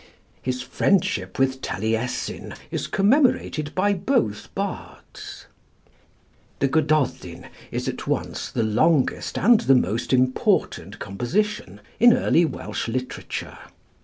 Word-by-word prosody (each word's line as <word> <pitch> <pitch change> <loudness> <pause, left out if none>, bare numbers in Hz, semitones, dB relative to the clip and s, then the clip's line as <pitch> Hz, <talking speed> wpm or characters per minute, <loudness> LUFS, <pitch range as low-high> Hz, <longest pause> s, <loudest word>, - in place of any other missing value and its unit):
His 125 -1 -3
friendship 110 - 0
with 130 0 +1
Taliessin 110 +4 -3 0.2
is - - -3
commemorated 200 - +2
by 205 +2 +2
both 190 - -1
bards. - - -7 1.1
The 140 - +2
'Gododin' 155 -1 0 0.2
is - - -4
at - - -4
once - - -2
the 115 - -1
longest 130 +7 +1
and 230 +2 +5
the 135 - +4
most 115 0 0
important 130 0 +1
composition 120 - -2 0.2
in 240 +1 +7
early 170 - +3
Welsh 155 - -4
literature. 125 +2 -5
135 Hz, 105 wpm, -23 LUFS, 115-195 Hz, 1.1 s, in